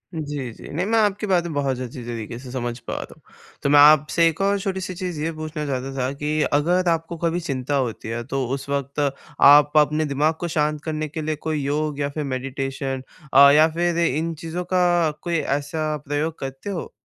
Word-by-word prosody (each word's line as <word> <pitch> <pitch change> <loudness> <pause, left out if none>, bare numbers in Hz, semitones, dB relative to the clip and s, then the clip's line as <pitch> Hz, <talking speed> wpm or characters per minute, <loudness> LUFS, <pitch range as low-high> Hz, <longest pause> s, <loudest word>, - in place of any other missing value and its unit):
जी, 145 -5 -4
जी। - - -12
नहीं, 170 +5 -1
मैं 225 +2 +2
आपकी 210 0 +1
बातें 175 -3 +1
बहुत 135 -3 -1
अच्छी 125 0 -7
तरीक़े 115 -1 -6
से 125 -1 -10
समझ 120 -2 -3
पा 115 - -6
रहा - - -6
हूँ। - - -25 0.4
तो - - +2
मैं 145 0 +6
आपसे 150 +3 +6
एक 165 -1 -1
और 200 +1 +2
छोटी-सी 190 -2 -3
चीज़ 180 -3 -4
ये 165 +2 -1
पूछना 155 -1 -5
चाहता 135 -1 -3
था 130 0 0
कि 150 +2 -1
अगर 175 +5 +2
आपको 165 +1 -1
कभी 170 +1 0
चिंता 140 -4 -2
होती 125 -5 -2
है, 115 +1 -3
तो 135 +1 -2
उस 135 +2 -4
वक़्त 140 0 -1 0.4
आप 145 0 +7
अपने 150 +1 +3
दिमाग 150 +2 +1
को 175 - -2
शांत 150 -2 0
करने 155 -1 -3
के 155 +2 -5
लिए 155 0 -2
कोई 155 0 -3
योग 145 +1 -1
या 140 0 0
फिर 150 +1 -4
मेडिटेशन 135 0 -3 0.3
अ, 140 +1 +9
या 155 +2 +6
फ़िर 170 +1 0
इन 165 +3 -1
चीज़ों 165 +3 -5
का 175 -3 +3
कोई 175 -1 -2 0.2
ऐसा 155 +1 -3
प्रयोग 150 +3 -2
करते 135 +7 -6
हो? 185 -4 -5
150 Hz, 210 wpm, -23 LUFS, 135-165 Hz, 0.4 s, अ